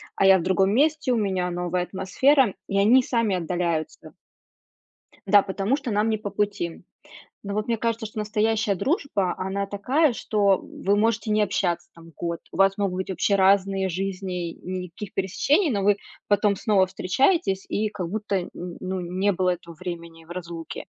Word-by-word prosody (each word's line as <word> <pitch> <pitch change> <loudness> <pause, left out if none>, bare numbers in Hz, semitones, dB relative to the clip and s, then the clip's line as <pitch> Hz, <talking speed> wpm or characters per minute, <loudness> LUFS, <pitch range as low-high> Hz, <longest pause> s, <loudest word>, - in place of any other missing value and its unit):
а - - +2
я 190 0 +8
в - - -4
другом 190 +1 +2
месте, 295 0 +2
у 240 - +2
меня 190 -4 0
новая 175 0 -1
атмосфера, 220 +6 +2
и 195 - -1
они 235 +6 +6
сами 230 -6 0
отдаляются. 170 -2 -3 1.1
Да, 200 0 +6
потому 195 +6 -1
что 265 -5 -5
нам 210 +2 +1
не 220 -1 0
по 205 -1 -5
пути. 200 -4 -2 0.6
Но 200 0 -4
вот 215 +3 -2
мне 230 -1 0
кажется, 230 0 -2
что 215 0 -6
настоящая 215 0 +1
дружба 200 - 0
она 195 +1 -2
такая, 255 +9 +2
что, 205 -4 +2
м, - - -11
вы 200 +1 +3
можете 225 0 +1
не 215 - +3
общаться 175 -4 0
там 165 0 -14
год, 170 -1 -3
у - - -8
вас 195 +1 +4
могут 195 -3 -1
быть 185 +1 -4
вообще 200 +2 +1
разные 195 0 +3
жизни, 185 -1 -3
и - - -12
никаких 185 +2 -6
пересечений, 280 - +1
но 200 -3 -1
вы 205 0 +4 0.3
потом 205 -1 +2
снова 200 -2 +3
встречаетесь 195 - +1
и 215 +1 0
как 185 -5 -5
будто 210 0 -2
н 175 - -8
н 175 0 -7
ну 185 0 -3
не 185 +3 0
было 185 0 +1
этого 170 -1 -6
времени 170 -2 -8
в 170 - -13
разлуке. 170 -2 -7
195 Hz, 185 wpm, -24 LUFS, 180-215 Hz, 1.1 s, я